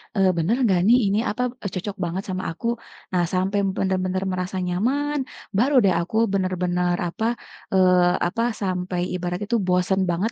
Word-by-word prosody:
eee, 195 -2 +4
bener 170 +8 +2
gak 185 -2 +3
nih 245 +2 +7
ini 200 - +1
apa, 220 - -3 0.2
e - - +2
cocok 195 +2 -4
banget 175 +3 -2
sama 185 0 -3
aku, 230 - -5 0.4
nah 180 -1 +2
sampai 190 +2 +1 0.2
benar-benar 185 0 0
merasa 185 0 -3
nyaman 265 +12 0 0.4
baru 265 +7 +3
deh 190 - +4
aku 175 +5 -6 0.2
bener-bener 180 -2 0
apa, 195 +6 -3 0.5
eee, 180 -1 +5
apa, 200 +6 -2 0.2
sampai 180 -1 -2
ibarat 180 0 -3
itu 235 - 0
bosen 180 +1 +2
banget, 185 +7 0
185 Hz, 165 wpm, -23 LUFS, 180-200 Hz, 0.5 s, nih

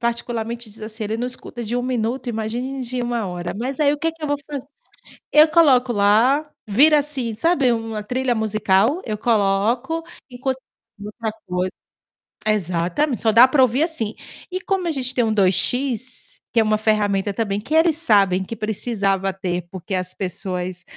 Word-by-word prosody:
particularmente 235 0 -3
diz 215 - -15
assim: 215 0 -5
"Ele 215 +2 -2
não 240 +2 -2
escuta 250 -1 -6
de 235 +2 -2
1 245 - -1
minuto, 245 0 -2
imagine 240 +4 -3
de 250 0 -3
1 240 -3 -2
hora". 175 -1 -5
Mas 255 +4 -4
aí, 290 -2 +4
o 295 - -3
que 325 +1 0
que 325 -1 -18
eu - - -1
vou 290 - 0
fazer? 280 -2 -5 0.7
Eu 305 +1 +7
coloco 275 -6 +4
lá, 235 +8 +3 0.2
vira 290 +9 +5
assim, 275 -6 -2
sabe 285 0 +2
uma 225 -2 -4
trilha 250 +4 -1
musical, 220 - +1
eu 215 -2 -3
coloco, 225 +8 +1 0.3
enquan 260 +1 -2 0.5
e 205 - -8
outra 220 +1 -4
coisa. 180 +1 -2 0.7
Exatamente, 200 - 0
só 220 - +3
dá 235 +4 +8
pra 265 +1 +3
ouvir 255 +3 +3
assim. 240 -11 -1 0.4
E 370 - -2
como 380 -2 -1
a - - +1
gente 260 -3 -2
tem 245 - +3
um 220 -1 +1
2X, 245 - +1 0.2
que 235 - +2
é - - +5
uma 215 0 +2
ferramenta 205 -2 +1
também, 200 -2 -1
que 245 +9 -6
eles 320 0 +4
sabem 200 - +3
que 190 - -7
precisava 200 -3 -1
ter, 180 -1 -3
porque 190 +1 -5
as 185 0 -3
pessoas, 180 -1 -4
230 Hz, 180 wpm, -21 LUFS, 205-260 Hz, 0.7 s, dá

